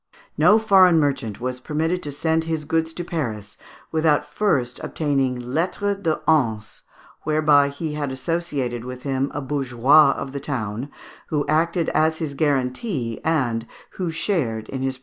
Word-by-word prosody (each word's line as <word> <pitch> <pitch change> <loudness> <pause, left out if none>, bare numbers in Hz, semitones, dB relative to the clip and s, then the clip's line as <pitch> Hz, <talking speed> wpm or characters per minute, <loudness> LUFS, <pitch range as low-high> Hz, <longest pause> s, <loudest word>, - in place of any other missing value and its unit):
No 210 - +6
foreign 190 -6 +5
merchant 135 -8 -1
was 125 +1 -3
permitted 160 +6 -1
to 145 - -5
send 160 +3 0
his 160 -2 -2
goods 160 +1 0
to 175 - -4
Paris 110 - -4 0.4
without 155 -2 +2
first 145 -6 0
obtaining 135 -5 0
lettres 180 +10 -1
de 165 -6 -1
Hanse, 115 -9 +1 0.4
whereby 150 -2 +3
he 150 +2 -5
had 145 -2 -3
associated 130 -4 -2
with 125 0 -8
him 135 0 -1
a 145 - -4
bourgeois 140 +1 +4
of 135 - -6
the 140 - -4
town, 125 -2 -4 0.4
who 150 -2 -1
acted 165 +2 +1
as 160 0 +2
his 155 -4 -4
guarantee, 135 - -1
and 120 -8 0 0.2
who 180 -3 -3
shared 155 - -1
in 130 - -4
his 135 0 -1
profits. - - -16
145 Hz, 155 wpm, -22 LUFS, 130-160 Hz, 0.4 s, No